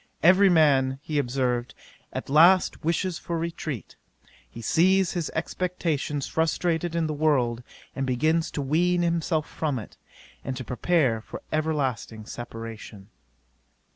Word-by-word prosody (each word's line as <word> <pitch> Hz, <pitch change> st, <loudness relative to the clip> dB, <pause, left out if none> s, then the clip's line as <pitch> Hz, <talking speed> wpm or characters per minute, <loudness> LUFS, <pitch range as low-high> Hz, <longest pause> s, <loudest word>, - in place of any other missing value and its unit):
Every 190 Hz, +4 st, +6 dB
man, 140 Hz, -6 st, +4 dB
he 150 Hz, -2 st, -1 dB
observed, 125 Hz, -2 st, -1 dB, 0.4 s
at -, -, -5 dB
last 170 Hz, +6 st, +5 dB
wishes 170 Hz, +2 st, -1 dB
for 170 Hz, -, -3 dB
retreat: 160 Hz, -, -5 dB, 0.5 s
he -, -, -11 dB
sees 185 Hz, -, +3 dB
his 175 Hz, -4 st, -2 dB
expectations 160 Hz, -4 st, -2 dB
frustrated 165 Hz, +1 st, 0 dB
in 165 Hz, -1 st, +1 dB
the 155 Hz, -, -2 dB
world, 135 Hz, -6 st, +1 dB, 0.3 s
and 135 Hz, -, -2 dB
begins 155 Hz, +6 st, +1 dB
to 145 Hz, -, -2 dB
wean 175 Hz, +5 st, +2 dB
himself 165 Hz, -2 st, 0 dB
from 150 Hz, -4 st, -2 dB
it, 110 Hz, -, -9 dB, 0.5 s
and 130 Hz, -1 st, -4 dB
to 130 Hz, -, -5 dB
prepare 125 Hz, -3 st, +1 dB
for -, -, -9 dB
everlasting 140 Hz, -8 st, -2 dB
separation. 115 Hz, -3 st, -8 dB
155 Hz, 130 wpm, -26 LUFS, 130-170 Hz, 0.5 s, Every